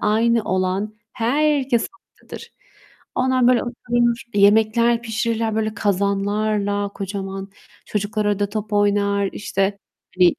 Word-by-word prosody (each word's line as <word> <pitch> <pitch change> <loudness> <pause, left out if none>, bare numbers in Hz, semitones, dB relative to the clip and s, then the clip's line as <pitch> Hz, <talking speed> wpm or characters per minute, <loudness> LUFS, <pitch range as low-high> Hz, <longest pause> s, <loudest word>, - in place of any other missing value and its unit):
aynı 225 +2 +2
olan 185 +3 -1 0.2
herkes 270 0 +1 0.4
oradadır. 465 - -10 0.6
Onlar, 255 -1 +2
böyle, 250 -2 +4
oturur, 240 -1 0
yemekler 220 +3 +4
pişirirler, 225 0 -1
böyle, 220 0 -1
kazanlarla 205 0 0
kocaman. 195 0 -5 0.4
Çocuklar 210 +1 -2
orada 205 -1 +1
top 215 0 -4
oynar, 200 -1 +2
işte, 195 0 -1 0.4
hani, 180 -1 +5
215 Hz, 105 wpm, -21 LUFS, 200-235 Hz, 0.6 s, hani